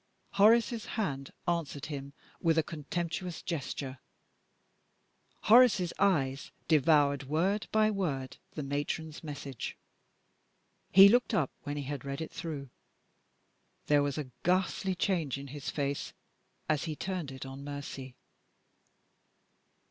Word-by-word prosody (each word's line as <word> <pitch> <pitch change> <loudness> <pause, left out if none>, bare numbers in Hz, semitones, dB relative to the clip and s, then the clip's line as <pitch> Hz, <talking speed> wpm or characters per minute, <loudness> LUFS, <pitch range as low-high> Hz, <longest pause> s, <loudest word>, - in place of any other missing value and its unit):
Horace's 225 +2 +4
hand 140 -10 -2 0.2
answered 165 -5 -1
him 140 -2 -6 0.3
with 165 -1 +3
a 160 - +4
contemptuous 170 +3 -4
gesture. 135 -4 -4 1.4
Horace's 215 -6 +6
eyes 140 -9 +2 0.2
devoured, 145 -2 +4
word 180 +9 0
by 215 0 +4
word, 145 -10 -2 0.2
the 150 - -4
Matron's 145 +3 -3
message. 140 -4 -6 1.1
He 195 +1 +10
looked 245 +4 +3
up 140 -6 +1
when 145 0 -3
he 145 - -3
had 140 -1 -5
read 140 0 -4
it 160 - -5
through. 140 -6 -6 1.1
There 145 -1 +4
was 145 0 -1
a 140 -4 -4
ghastly 185 +1 +1
change 170 -8 0
in 140 0 -8
his 145 +1 -5
face 140 -1 -2 0.5
as 155 0 +1
he 155 -2 -3
turned 180 -5 -4
it 130 0 -7
on 135 +1 -8
Mercy. 140 -2 -7
150 Hz, 120 wpm, -31 LUFS, 140-180 Hz, 1.4 s, He